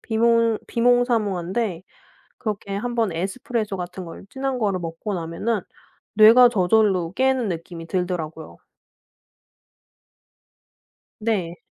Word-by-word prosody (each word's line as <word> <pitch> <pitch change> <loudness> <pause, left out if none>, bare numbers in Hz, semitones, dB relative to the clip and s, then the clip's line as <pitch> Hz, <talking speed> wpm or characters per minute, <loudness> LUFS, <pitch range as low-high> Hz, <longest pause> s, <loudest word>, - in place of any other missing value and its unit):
비몽 230 -1 +2
비몽사몽한데 225 -6 +1 0.6
그렇게 205 -3 -4
한번 230 -1 -1
에스프레소 205 +4 -3
같은 180 0 -6
걸 165 - -10
진한 265 -1 -3
거를 200 -4 0
먹고 165 +5 -5
나면은 175 +6 -2 0.5
뇌가 230 +4 +8
저절로 190 -4 +2
깨는 260 -1 +1
느낌이 165 -1 -6
들더라고요. 170 -4 -4 2.6
네. 190 -6 -1
205 Hz, 235 characters per minute, -23 LUFS, 175-230 Hz, 2.6 s, 뇌가